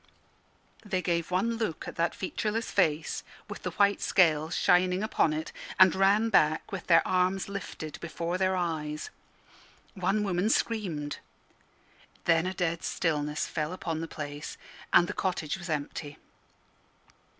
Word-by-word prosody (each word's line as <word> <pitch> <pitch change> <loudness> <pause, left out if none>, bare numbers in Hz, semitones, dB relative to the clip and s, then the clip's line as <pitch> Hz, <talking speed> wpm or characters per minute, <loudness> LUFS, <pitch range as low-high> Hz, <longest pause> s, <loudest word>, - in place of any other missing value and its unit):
They 190 -4 -2
gave 170 -2 0
one 225 +6 0
look 215 -9 -3
at - - -6
that 170 +1 0
featureless 215 +4 -2
face, 160 -5 +1 0.2
with - - -7
the - - -2
white 200 -1 +2
scales 160 -2 +3
shining 180 +2 +3
upon 215 -7 +2
it, 155 +1 -3 0.3
and 185 -2 +8
ran 200 +4 +3
back 155 -6 +3
with 195 -3 -5
their 165 -2 +5
arms 185 +1 +1
lifted 200 -6 -6
before 170 +1 -3
their 190 0 +2
eyes. 155 -4 -3 0.8
One 195 +3 0
woman 190 +1 +1
screamed. 180 -12 -1 1.1
Then 165 +1 +3
a 190 - -2
dead 170 -2 -1
stillness 150 -3 -1
fell 155 +4 -3
on 165 -2 -1
the 165 - -4
place, 145 -1 -6 0.3
and 175 - +6
the - - -3
cottage 175 -5 -1
was 175 -1 -8
empty. 145 -1 -4
175 Hz, 140 wpm, -29 LUFS, 155-190 Hz, 1.1 s, and